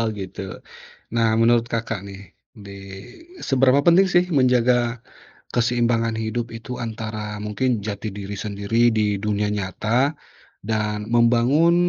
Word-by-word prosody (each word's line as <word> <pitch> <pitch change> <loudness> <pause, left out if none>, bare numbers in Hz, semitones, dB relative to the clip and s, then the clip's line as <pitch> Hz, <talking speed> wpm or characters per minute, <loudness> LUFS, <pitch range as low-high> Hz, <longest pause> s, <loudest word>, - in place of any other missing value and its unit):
Oh, 115 - +1
gitu? 95 -1 -7 0.8
Nah, 115 -1 +3
menurut 115 0 +4
Kakak 115 -3 -2
nih, 100 -1 -9 0.5
di 100 - -9 0.7
seberapa 135 0 +3
penting 175 +3 +6
sih 175 0 +3
menjaga 125 -4 +2 0.5
keseimbangan 120 -1 +1
hidup 115 +1 -3
itu, 115 +2 -7
antara 110 -2 -5
mungkin 110 +2 -1
jati 105 0 -4
diri 100 0 -6
sendiri 105 +4 +1
di 105 -1 +1
dunia 105 0 -1
nyata 105 - 0 0.5
dan 105 0 -2
membangun 120 +8 +4
115 Hz, 120 wpm, -22 LUFS, 105-120 Hz, 0.8 s, penting